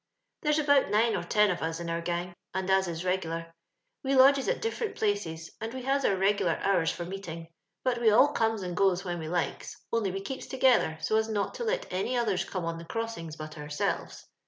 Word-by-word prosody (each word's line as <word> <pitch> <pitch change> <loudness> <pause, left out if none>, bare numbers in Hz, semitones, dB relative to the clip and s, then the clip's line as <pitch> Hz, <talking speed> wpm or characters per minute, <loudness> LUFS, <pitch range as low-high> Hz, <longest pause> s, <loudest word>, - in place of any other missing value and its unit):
^There^ 300 0 +3
about 285 -2 +4
nine 225 +2 +3
<Hr - - 0
ten 210 -2 +4
of 175 - -2
ua 160 - 0
in 165 +1 -4
onr 170 0 -2
gang, 175 +1 -2 0.2
and 190 0 0
as 190 -1 +3
is 170 0 -4
reg'lar; 165 -2 -2 0.5
we 270 0 0
lodgea 270 +1 +6
at - - -12
^fEenot 455 0 -2
places, 170 -7 -2
and 225 +3 -4
we 260 - -5
has 275 +1 +1
our 195 - +3
reglar 190 -3 +1
hoars 185 -5 +3
for 175 0 -4
meet 195 +1 -7
ing, 165 0 -7 0.3
but 245 -2 0
we 230 - +6
all 245 +7 +6
comes 225 -6 0
and 180 -1 -4
goes 190 -1 +2
when 175 -1 -3
we 160 - -5
hkes,. 175 +1 -2 0.2
only 225 -4 +1
we 195 +1 -4
keeps 260 +7 -6
together, 255 - +3
so 215 +7 +1
as 220 0 +1
not 205 -2 -1
to - - -4
let 485 +2 -1
any 215 +7 0
others 205 -6 +1
come 185 -3 -4
on 165 0 -3
the 170 - -9
crossings 225 -7 -4
but 155 0 -8
ourselves. 150 0 -3
195 Hz, 225 wpm, -29 LUFS, 170-230 Hz, 0.5 s, lodgea